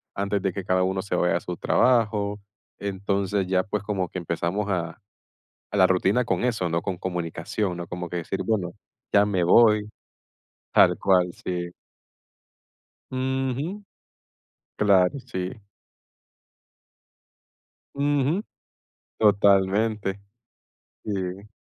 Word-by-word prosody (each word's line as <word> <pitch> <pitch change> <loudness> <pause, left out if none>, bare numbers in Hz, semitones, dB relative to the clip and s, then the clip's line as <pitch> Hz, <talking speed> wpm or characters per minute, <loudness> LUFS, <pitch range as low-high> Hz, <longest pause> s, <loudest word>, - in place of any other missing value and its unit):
antes 100 0 -1
de 95 0 0
que 95 - -4
cada 95 -1 +2
uno 95 +1 0
se 100 - -3
vaya 90 -1 +2
a - - -3
su 90 -1 -5
trabajo. 105 -4 +2 0.4
Entonces, 100 0 -1
ya 95 0 +2
pues 100 +2 -3
como 100 -3 -2
que - - -7
empezamos 85 +4 -2
a 85 -3 -2 0.7
a - - -3
la 95 -2 +6
rutina 95 +6 +2
con - - -1
eso, 110 -8 0
¿no?, 85 0 -1
con 95 -3 -3
comunicación, 90 +2 -3
¿no? 85 0 -6
Como 90 0 -5
que 90 - -5
decir 85 +3 -3
bueno, 100 -6 -1 0.4
ya 100 - +6
me 95 -4 +1
voy. 105 +2 +5 0.8
Tal - - +5
cual, 90 -2 +3 0.2
sí. 90 -1 -3 1.4
Ujú. 130 +8 -2 0.9
Claro, 100 +3 +3
sí. 95 -8 -4 2.5
Ujú. 145 +6 +1 0.7
Totalmente. 100 0 +3 0.8
Sí. 95 -1 -4
100 Hz, 115 wpm, -25 LUFS, 90-105 Hz, 2.5 s, la